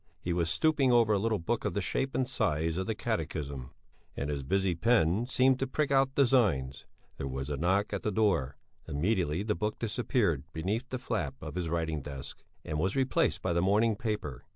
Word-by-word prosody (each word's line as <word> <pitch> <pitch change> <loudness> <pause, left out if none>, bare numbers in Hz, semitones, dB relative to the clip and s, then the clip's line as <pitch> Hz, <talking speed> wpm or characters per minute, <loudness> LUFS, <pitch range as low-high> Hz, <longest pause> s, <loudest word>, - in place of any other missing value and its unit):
He 85 - -2
was 85 -1 0
stooping 145 - +2
over 115 -3 +5
a 100 - +2
little 110 +1 +1
book 110 +7 -2
of 105 -4 -2
the - - +1
shape 135 +7 -2
and 130 - +1
size 85 - 0
of 95 - -2
the 110 - -1
Catechism, 70 -9 -3 0.5
and 70 +1 -2
his 70 -1 -2
busy 95 +6 +1
pen 110 +2 +2
seemed 130 0 +3
to 135 - 0
prick 145 +2 -1
out 135 -1 +3
designs. 105 - +2 0.3
There 70 - -3
was 65 +2 -4
a - - 0
knock 95 +8 +1
at 100 - -2
the - - -1
door; 85 -11 +1 0.3
immediately 85 +2 0
the 105 0 0
book 105 0 -2
disappeared 110 - 0
beneath 105 +11 -2
the 130 - -2
flap 125 - -3
of - - -7
his 90 -2 -2
writing 80 -2 -1
desk, 70 -1 -8 0.2
and 75 -1 -2
was 95 +5 0
replaced 130 -1 +1
by 90 - +1
the 85 - +2
morning 105 +4 +3
paper. 105 - -4
100 Hz, 200 wpm, -30 LUFS, 80-120 Hz, 0.5 s, over